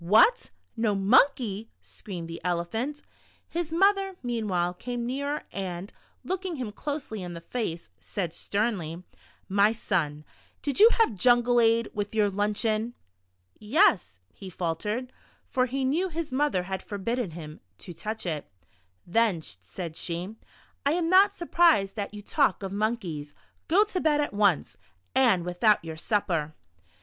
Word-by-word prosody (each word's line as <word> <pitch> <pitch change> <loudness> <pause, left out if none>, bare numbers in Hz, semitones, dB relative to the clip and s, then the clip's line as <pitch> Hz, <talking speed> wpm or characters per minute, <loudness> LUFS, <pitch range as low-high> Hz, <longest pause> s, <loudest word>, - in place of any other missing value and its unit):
"What, 225 - +5 0.3
no 225 -3 +1
monkey?" 220 +1 +3
screamed 175 -5 -8
the 165 0 -7
Elephant. 200 - -2 0.4
His 340 -2 -3
mother, 390 +2 +3
meanwhile, 205 -8 -1
came 240 +5 -4
nearer, 280 +4 -2
and 185 -1 -5 0.3
looking 375 -2 -3
him 250 -7 -4
closely 270 -3 -5
in 175 -1 -6
the 170 - -8
face, 170 -4 -4
said 175 -5 -4
sternly: 185 -5 -2 0.2
" - - -32
My 210 +2 +6
son, 155 -9 -2 0.4
did 285 +3 0
you 440 +3 +9
have 450 - +3
jungle 240 +3 +4
ade 230 0 +3
with 205 +1 -3
your 210 -2 +3
lunch 205 +3 0
eon?" 220 +2 0 0.6
"Yes," 215 - +3
he 190 - -9
faltered 210 +9 -3 0.3
(for 255 -1 +1
he 265 +1 -1
knew 335 +8 +1
his 325 -2 -4
mother 260 -9 +1
had 190 0 -4
forbidden 225 +2 -3
him 155 -2 -9 0.2
to 175 - -9
touch 215 +7 -5
it). 155 -4 -3 0.6
"Then," 190 -3 +2 0.2
said 160 - -7
she, 175 +6 -4 0.5
"I 285 - +2
am 340 0 0
not 400 +2 +6
surprised 335 - +3
that 205 -3 -3
you 205 0 -9
talk 245 - +1
of 190 - -4
monkeys. 195 -9 -2 0.3
Go 380 +6 +5
to 400 -4 -3
bed 300 -2 +3
at 290 - -1
once, 200 -6 +2 0.4
and 230 -10 +4
Avithout 190 +4 +3
your 160 -1 -6
supper." 160 -5 -1
215 Hz, 150 wpm, -27 LUFS, 180-270 Hz, 0.6 s, you